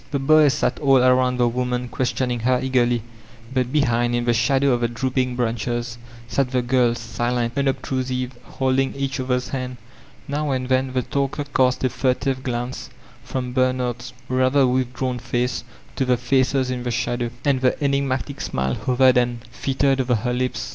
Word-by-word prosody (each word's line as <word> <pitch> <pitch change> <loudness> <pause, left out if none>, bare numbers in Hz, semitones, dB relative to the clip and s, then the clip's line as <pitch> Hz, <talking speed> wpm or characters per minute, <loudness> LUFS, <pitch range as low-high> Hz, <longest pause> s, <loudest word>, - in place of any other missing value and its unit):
The 140 - -1
boys 145 +1 +5
sat 150 - 0
all 135 -2 +4
about 125 0 +3
the 120 -1 +3
wonuui 125 0 -2
questioning 125 -1 -1
her 125 +2 +2
eagerly, 120 -3 +1 0.5
but 130 -1 0
behind 120 -4 +2
in 120 0 -1
the 120 - +3
shadow 135 +4 +2
of 120 -1 +1
the 120 - +2
drooping 125 +1 -1
branches 120 0 -2 0.3
sat 135 +1 0
the 125 -1 0
girb» 120 -1 +2
silent, 120 +1 -2
unobtrusive, 130 -2 -1
holding 135 0 0
each 140 0 -2
other's 125 -1 -1
hands. 130 -2 -4 0.5
Now 145 +1 -2
and 130 -1 -2
then 130 0 +1
the 130 -1 0
talker 140 +2 -2
cast 130 -2 +1
a 130 - +3
furtive 130 +1 0
glance 125 +1 -4 0.3
from 125 -1 -4
Bernard's 125 -2 0 0.2
rather 130 +2 +3
withdrawn 125 0 -1
face 120 +1 -2 0.3
to - - +1
the 125 -1 +2
faces 130 +1 +1
in 125 -1 -3
the 120 - -3
shadow, 120 0 -1 0.2
and 135 -3 +2
the 130 -1 +2
enigmatic 140 -1 -1
smile 65 0 -1
hovered 130 0 +3
and 120 -1 0
flitted 135 +1 +1
over 125 -1 +1
her 125 +3 -1
lips. 125 +1 -2
125 Hz, 170 wpm, -22 LUFS, 120-130 Hz, 0.5 s, boys